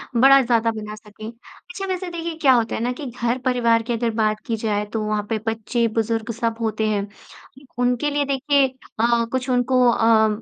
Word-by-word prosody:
बड़ा 270 +3 +7
ज़्यादा 230 -2 +1
बना 215 -1 -7
सकें। 215 0 -12
अच्छा, 355 +10 -10
वैसे 370 -1 -3
देखिए, 335 -1 -5
क्या 265 -3 +6
होता 230 -2 +1
है - - -3
ना 245 +1 0
कि - - -5
घर-परिवार 240 -1 0
की 240 +1 -2
अगर 230 0 -1
बात 215 0 +1
की 230 - 0
जाए, 210 -1 -1
तो 215 +1 -4
वहाँ 210 -1 -1
पे 225 - 0
बच्चे, 225 +1 0
बुज़ुर्ग 225 +1 -1
सब 230 -1 0
होते 220 -1 -1
हैं। 205 -1 -1 0.7
उनके 250 +4 +1
लिए, 290 0 0
देखिए 275 0 +2 0.3
अ, 235 0 +2
कुछ 260 0 -2
उनको 250 0 +2
अ, 225 -1 +4
235 Hz, 190 wpm, -22 LUFS, 220-260 Hz, 0.7 s, बड़ा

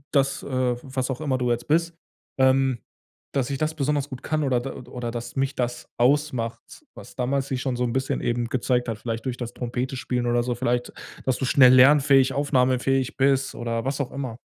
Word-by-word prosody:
Das, 135 -1 +2
äh, 130 -2 0
was 130 -1 -3
auch 130 +2 -3
immer 135 -4 0
du 125 -1 0
jetzt 120 0 -1
bist, 165 +2 +1 0.4
ähm, 130 -1 +3 0.6
dass 135 -3 0
ich 140 - -2
das 155 +2 -1
besonders 145 -1 -1
gut 130 -2 -8
kann 155 0 -1
oder 130 -3 +2
d 130 +3 -5
oder 125 -2 -6
dass 120 0 -6
mich 135 +1 -1
das 120 -1 -3
ausmacht, 125 -2 0
was - - -13
damals 135 +2 -1
sich 130 -2 -2
schon 130 -2 -1
so 125 - -1
'n 120 -1 -1
bisschen 130 0 -1
eben 120 0 0
gezeigt 125 +1 0
hat, 110 -2 -3
vielleicht 115 0 -4
durch 125 -2 -3
das 120 -1 -6
Trompete 125 +2 -3
spielen 125 0 -2
oder 120 0 +2
so, 125 0 -1
vielleicht, 120 0 -1 0.3
dass 130 -2 +1
du 135 - -2
schnell 130 -1 +6
lernfähig, 135 0 +6
aufnahmefähig 130 -2 +1
bist 135 0 +2
oder 115 -1 -3
was 135 +1 -2
auch 135 - -4
immer. 130 -4 -5
130 Hz, 205 wpm, -24 LUFS, 120-135 Hz, 0.6 s, schnell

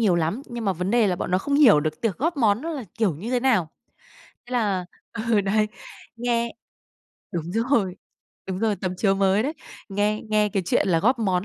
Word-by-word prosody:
nhiều 205 -6 +3
lắm. 170 - -1
Nhưng 240 -2 -6
mà 195 - +2
vấn 180 +2 -3
đề 235 -2 +4
là 180 - 0
bọn 175 - -4
nó 185 - +3
không 280 +8 -2
hiểu 245 - +7
được 155 0 -3
tiệc 215 -5 -1
góp 320 +3 0
món 220 -4 +3
nó 330 - -3
là 285 -7 -5
kiểu 210 -8 +1
như 205 - -6
thế 250 - +1
nào. 220 -11 +2 0.8
Thế 245 - -10
là 200 -7 0 0.3
ừ, 225 -1 +1
đấy. 210 +2 +1 0.5
Nghe 235 -1 -1 0.8
đúng 170 -3 -2
rồi, 225 -5 +1 0.5
đúng 185 -1 -3
rồi, 215 -1 +1
tấm 185 -1 -3
chiếu 195 +1 +2
mới 195 +2 +2
đấy. 285 - -1 0.4
Nghe 205 +1 0
nghe 210 -1 +3
cái 195 -1 -1
chuyện - - +2
là 165 -3 +3
góp 245 +6 +3
món 190 -4 0
210 Hz, 215 wpm, -24 LUFS, 185-235 Hz, 0.8 s, hiểu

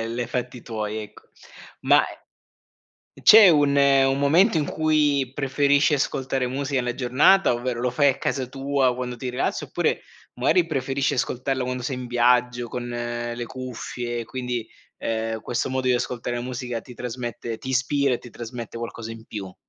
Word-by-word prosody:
li 120 - -2
hai 120 - -3
fatti 125 0 -4
tuoi 110 -2 -4
ecco. 105 - -14 0.6
Ma - - +5
eh - - -10 1.0
uhm, - - -15
c'è 215 -2 +9
un 145 -3 +3
un 135 -1 +4
momento 165 +7 +4
in 150 - +1
cui 150 -4 +1
preferisci 140 +2 +2
ascoltare 135 -2 -1
musica 135 0 -1
la 120 0 -2
giornata? 130 +7 +4
Ovvero, 120 0 -3
lo 125 0 0
fai 140 +3 +3
a 130 - 0
casa 130 -2 -2
tua 135 -1 0
quando 125 -1 -4
ti 125 +1 -5
rilassi 125 - -2
oppure, - - -1 0.3
magari, 160 +8 +3
preferisci 135 -2 -1
ascoltarla 130 +1 -1
quando 125 0 -3
sei 130 +1 -2
in 125 -1 -6
viaggio 120 0 +2
con 125 +1 -5
le 120 0 -4
cuffie? 120 -1 -5
Quindi, 125 -2 -4 0.3
ehm, 110 0 -2
questo 120 +2 -2
modo 130 0 -1
di 125 - +4
ascoltare 120 0 -2
la 120 - -3
musica 125 -2 -4
ti 125 - -12
trasmette 120 -2 -5
ti 130 - -8
ispira 135 +1 +1
e - - -5
ti 120 - -13
trasmette 115 0 -7
qualcosa 115 -1 -6
in 115 -1 -10
più? 95 -4 -7
125 Hz, 175 wpm, -24 LUFS, 120-135 Hz, 1.0 s, c'è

